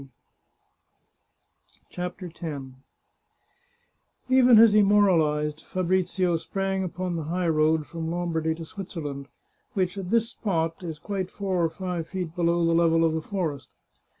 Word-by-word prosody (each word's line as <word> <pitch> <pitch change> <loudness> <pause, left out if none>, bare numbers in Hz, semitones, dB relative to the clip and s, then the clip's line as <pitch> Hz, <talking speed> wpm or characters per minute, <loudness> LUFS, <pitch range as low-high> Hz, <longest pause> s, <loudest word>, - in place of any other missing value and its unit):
CHAPTER 180 +1 -5
X - - -14 1.9
Even 255 -2 +6
as 225 -1 +8
he 210 - +6
moralized, 160 -7 +3
Fabrizio 185 -1 0
sprang 195 +3 -2
upon 180 0 -3
the 165 -3 -3
high 175 +2 -1
road 155 0 +2
from 165 0 -5
Lombardy 165 -2 -1
to 165 0 -8
Switzerland, 155 -7 -6 0.5
which, 190 0 -1
at 180 -2 -6
this 230 +1 +2
spot, 165 -6 -2
is 165 -3 -6
quite 190 +3 -4
four 190 -4 -1
or 165 - +2
five 180 -1 -4
feet 180 -4 -5
below 170 0 +2
the 165 - +2
level 165 0 +4
of 160 - +1
the 160 - -1
forest. 155 - -4
175 Hz, 135 wpm, -26 LUFS, 160-190 Hz, 1.9 s, as